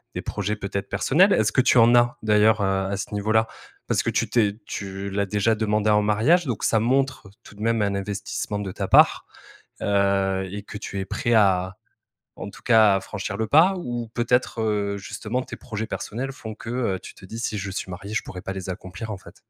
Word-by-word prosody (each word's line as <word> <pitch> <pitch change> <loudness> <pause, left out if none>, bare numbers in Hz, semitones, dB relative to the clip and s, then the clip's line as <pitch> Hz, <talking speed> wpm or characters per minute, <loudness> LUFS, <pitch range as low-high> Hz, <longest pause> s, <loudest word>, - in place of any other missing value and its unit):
des - - -3
projets 105 0 -2
peut-être 100 -1 -4
personnels. 185 +8 +3
Est-ce 110 -1 +2
que 130 - +3
tu 125 - +3
en 115 +1 +6
as, 120 0 +3
d'ailleurs, 110 0 +4
heu, 100 - +2 0.2
à 100 - -2
ce 105 - -6
niveau-là? 110 +2 +1 0.4
Parce - - +1
que - - 0
tu - - 0
t'es 105 -4 +2
tu 100 0 -5
l'as 100 +1 -1
déjà 105 +2 +1
demandée 105 0 +1
en 105 0 +4
mariage, 115 - +3
donc 120 -5 -3
ça 110 - +3
montre 130 -1 0
tout - - -14
de 105 - -12
même 115 0 +1
un 100 -1 0
investissement 100 +1 -4
de 100 -2 -4
ta - - -4
part. - - +5 0.6
Heu, 100 -1 +1
et 100 0 -6
que 105 - -8
tu 100 -1 -5
es 95 - -3
prêt 120 +4 -1
à 95 -3 +2 0.6
en 100 - -7
tout - - -15
cas 110 -4 +5
à - - -1
franchir 100 0 -5
le 110 +1 -1
pas? 160 - +5
Ou 120 -7 -4
peut-être, 125 0 +1
heu, 105 -2 0
justement 110 +5 -4
tes - - -8
projets 110 -2 -5
personnels 125 +4 -4
font 110 -5 -8
que, 115 - -10
heu, 120 -6 -1
tu - - -11
te - - -16
dis, 110 +4 -8
si 110 -2 -2
je 95 0 -4
suis 95 - -5
marié, 100 +4 -7
je - - 0
pourrais 90 -1 -8
pas 95 - -4
les 95 -1 -6
accomplir 95 +4 -7
en - - -4
fait? - - -15
105 Hz, 225 wpm, -24 LUFS, 100-115 Hz, 0.6 s, en